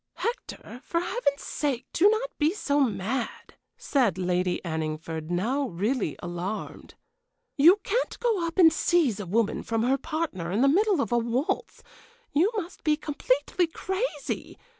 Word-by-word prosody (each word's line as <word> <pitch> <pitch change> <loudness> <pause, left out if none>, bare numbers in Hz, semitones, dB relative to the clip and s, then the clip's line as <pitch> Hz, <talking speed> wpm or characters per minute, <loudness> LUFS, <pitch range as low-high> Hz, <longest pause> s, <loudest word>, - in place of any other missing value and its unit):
"Hector, 465 - -5
for 335 - -1
Heaven's 340 - -1
sake 265 -4 -2
do 390 +5 +5
not 445 +4 -1
be 310 +5 +2
so 290 -8 0
mad," 235 -1 -2 0.2
said 240 - +1
Lady 180 0 0
Anningford, 160 0 -4
now 240 +11 0
really 200 - -1
alarmed. 175 +4 -5 0.6
"You 335 +8 +7
can't 480 +2 -1
go 425 -8 +1
up 330 - -7
and 330 -4 +7
seize 300 - +2
a 200 - -5
woman 215 +3 +1
from 225 -1 -1
her 265 +3 +2
partner 300 - -3
in 205 +5 +1
the 275 - +5
middle 380 +2 +3
of 225 - -2
a 240 - +3
waltz. 235 +5 -2 0.5
You 345 +9 +3
must 355 -3 -5
be 305 -1 +2
completely 295 +3 0
crazy! 375 - -4
275 Hz, 150 wpm, -27 LUFS, 200-335 Hz, 0.6 s, You